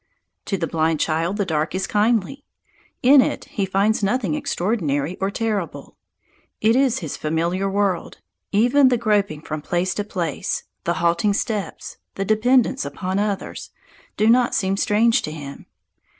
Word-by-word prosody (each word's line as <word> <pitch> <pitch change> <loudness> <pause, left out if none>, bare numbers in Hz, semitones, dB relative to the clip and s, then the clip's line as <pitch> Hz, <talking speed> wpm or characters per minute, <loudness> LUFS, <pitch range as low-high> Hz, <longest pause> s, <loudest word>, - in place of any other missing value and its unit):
To 195 - -1
the 165 - -1
blind 160 -1 0
child 165 +5 0
the 200 - 0
dark 155 -1 -1
is 190 0 -1
kindly. 220 +6 0 0.6
In 270 +2 +8
it - - -2
he 200 -3 -3
finds 200 +4 +1
nothing 205 -3 0
extraordinary 170 -4 -1
or 195 - +1
terrible. 210 -4 -3 0.6
It 225 +2 +3
is 260 -3 +2
his 145 - -4
familiar 170 +5 -1
world; 195 -3 -1 0.3
even 245 +7 +4
the 250 -1 +3
groping 205 -9 0
from 155 -1 -5
place 175 +4 -1
to 205 - -2
place, 175 -7 -3 0.2
the 170 - 0
halting 170 +5 +2
steps, 210 -2 -4 0.2
the 195 - -2
dependence 230 +4 +2
upon 185 +7 -3
others, 205 -1 -3 0.5
do 215 - +3
not 245 +1 +4
seem 195 -1 +1
strange 220 +3 +3
to 155 - -5
him. 145 -3 -9
195 Hz, 150 wpm, -22 LUFS, 170-220 Hz, 0.6 s, In